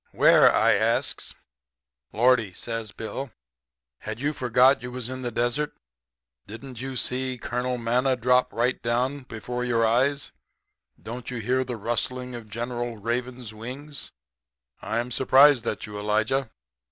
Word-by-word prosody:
"'Where?' - - +6
I - - +4
asks. - - 0 0.8
"'Lordy!' 115 -4 +3
says 115 +1 -5
Bill, 115 +7 -5 0.7
'had 110 +1 -6
you 145 +3 0
forgot 125 0 +4
you 125 - -6
was 125 -1 -5
in 130 0 -5
the 125 - -2
desert? 120 +6 -1 0.7
Didn't 120 +3 -9
you 130 0 -5
see 130 0 -1
Colonel 125 +1 -2
Manna 125 +3 +1
drop 125 +1 +3 0.3
down 125 +4 0
right 130 -2 -14
before 125 +2 -4
your 115 -2 +2
eyes? 135 +5 +1 0.7
Don't 120 +1 -7
you 125 - -4
hear 125 +3 +1
the 125 -2 -5
rustling 125 +3 -3
of 115 -3 -8
General 120 +1 -4
Raven's 120 +1 -3
wings? 130 +6 -7 0.7
I'm 120 +2 -2
surprised 130 0 +5
at - - -2
you, 105 -1 -7
Elijah.' 110 +5 0
125 Hz, 140 wpm, -26 LUFS, 115-130 Hz, 0.8 s, Where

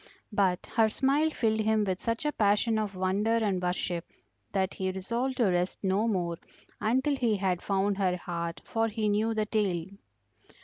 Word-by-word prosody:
But 190 -3 +1
her 220 -1 +5
smile 275 +7 +2
filled 220 -7 0
him 220 0 +2
with 190 -2 -2
such 230 +4 -2
a 295 - +2
passion 220 0 +2
of 205 -2 -3
wonder 195 +5 +1
and 200 -5 0
worship 180 -1 -1 0.5
that 190 -1 0
he 190 0 -2
resolved 235 +8 -2
to 220 -6 +3
rest 180 +1 0
no 195 +4 +2
more 175 -6 -1 0.4
until 260 +6 +1
he 235 -5 +1
had 185 -2 0
found 200 0 0
her 185 -2 +1
heart, 170 -1 -4
for 225 0 0
he 220 -1 -1
knew 215 +2 +1
the 215 -1 +1
tale. 195 -6 0
205 Hz, 175 wpm, -29 LUFS, 185-225 Hz, 0.5 s, her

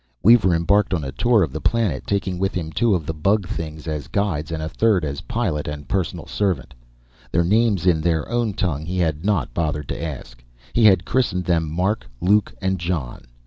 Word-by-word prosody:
Weaver 100 -4 +6
embarked 95 +3 +2
on 80 - -3
a 65 - -4
tour 115 - +3
of 75 - -2
the 80 - -4
planet, 105 - 0
taking 95 -3 -1
with 95 0 -1
him 80 -3 -3
two 115 +2 +2
of 80 -4 -3
the 80 - -3
bug 95 +5 +1
things 80 -1 -6
as 75 -2 -3
guides 85 -6 -1
and 80 -1 -3
a - - -2
third 100 -1 +2
as 70 -1 -4
pilot 90 -11 -2
and 75 -1 -6
personal 95 -5 -2
servant. 100 -4 -2 0.6
Their 85 - +2
names 105 -1 +2
in 85 -4 +3
their 80 -2 0
own 120 -3 0
tongue 80 -6 -2
he 90 +1 -3
had 80 -3 0
not 100 -11 0
bothered 75 -2 -2
to - - -4
ask; - - -7 0.3
he 115 - +4
had 95 -4 +5
christened 100 -9 0
them 80 -3 +1
Mark, 95 +7 -1
Luke 100 +4 +3
and 95 -1 0
John. 80 -8 -3
90 Hz, 205 wpm, -22 LUFS, 80-100 Hz, 0.6 s, Weaver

